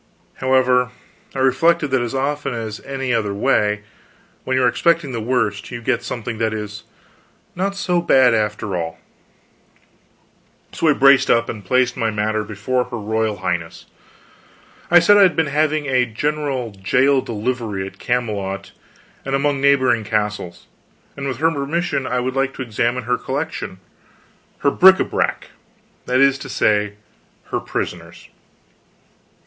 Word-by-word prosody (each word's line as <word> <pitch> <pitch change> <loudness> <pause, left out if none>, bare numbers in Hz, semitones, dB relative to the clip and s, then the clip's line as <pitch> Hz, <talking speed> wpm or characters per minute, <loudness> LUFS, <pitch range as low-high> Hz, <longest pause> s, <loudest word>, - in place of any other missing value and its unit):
However, 130 -1 +2 0.5
I - - -5
reflected 165 +4 +3
that 130 -2 +2
as 120 +2 -3
often 140 -1 -2
as 110 -2 -5
any 135 -2 -3
other 105 -3 -1
way, 105 -3 +1 0.6
when 130 0 0
you 130 - +2
are - - +5
expecting 165 +3 +1
the 115 -2 -4
worst, 110 -4 -1
you 120 - -6
get 120 0 0
something 115 -2 -5
that 110 -1 0
is 105 -1 -6 0.7
not 195 +2 -1
so 180 -3 0
bad, 130 -7 +4
after 105 -2 -1
all. 80 -1 -4 1.7
So 165 - -1
I 150 - +6
braced 140 -1 +5
up 115 0 +3
and 105 -3 -6
placed 125 +4 +1
my 115 - 0
matter 110 0 -1
before 110 +5 -2
her 125 -1 -6
royal 110 0 -1
Highness. 85 -1 -3 1.0
I 175 - +7
said 190 +4 +6
I - - +6
had 185 -3 +5
been 160 - +2
having 150 +1 0
a 130 -2 +2
general 135 0 -2
jail 125 +8 +2
delivery 110 -4 -3
at 95 - -11
Camelot 105 -6 -2 0.5
and 135 0 -1
among 140 0 0
neighboring 130 -5 +3
castles, 105 -4 -3 0.5
and 140 -1 -5
with 130 -3 -3
her 160 +4 +2
permission 145 0 -2
I 125 0 0
would 130 +1 -3
like 135 0 0
to 130 - -4
examine 120 +1 -1
her 125 +1 -1
collection, 145 -7 -4 0.8
her 140 - +3
bric 190 +4 +7
a - - +3
brac - - -2 0.6
that 125 +1 +2
is 140 0 +4
to - - -8
say, 105 -1 +1 0.6
her - - 0
prisoners. - - -6
125 Hz, 155 wpm, -20 LUFS, 110-140 Hz, 1.7 s, I